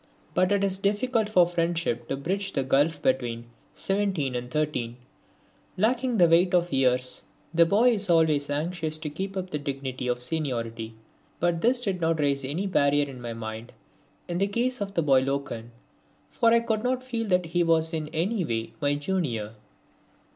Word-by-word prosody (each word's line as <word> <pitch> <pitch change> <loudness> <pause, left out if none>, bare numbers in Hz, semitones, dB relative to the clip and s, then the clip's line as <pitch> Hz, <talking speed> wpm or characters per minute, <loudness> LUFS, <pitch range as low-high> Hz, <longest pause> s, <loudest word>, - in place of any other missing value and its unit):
But 185 +1 +2
it 200 -1 +2
is 190 -1 0
difficult 210 +2 +1
for 180 -5 +5
friendship 170 -7 -1
to 135 - -2
bridge 195 +7 -2
the 135 - +1
gulf 145 +4 +2
between 120 -3 0 0.3
17 195 -9 0
and 125 0 -4
13. 125 -5 -2 0.8
Lacking 240 +4 +1
the 175 -3 +6
weight 175 +2 +4
of 175 -2 +1
years 125 -1 +1 0.3
the 170 0 +5
boy 225 +7 +4
is 205 -4 -1
always 155 -4 +3
anxious 155 +1 -2
to 155 -1 -5
keep 195 +5 -5
up 185 0 -4
the 150 - -2
dignity 135 -3 -4
of 125 0 -1
seniority. 115 -7 -3 0.4
But 170 -1 +1
this 245 +2 +3
did 195 -7 -2
not 165 -1 +1
raise 140 -2 +1
any 150 +9 -2
barrier 145 -6 +2
in 130 -3 -9
my 120 -1 -5
mind 110 0 -7 0.5
in 175 0 -2
the 200 - +2
case 240 +3 -1
of 200 0 -4
the 170 - +2
boy 135 -3 +4
Loken, 135 -4 -3 0.6
for 230 -2 +3
I 235 0 +5
could 220 -2 -1
not 255 0 0
feel 230 -3 -3
that 180 -2 +2
he 175 +2 0
was 165 0 +2
in 155 -2 -1
any 180 +7 -1
way 115 -6 -3
my 145 0 +2
junior. 145 - -2
165 Hz, 180 wpm, -26 LUFS, 135-195 Hz, 0.8 s, the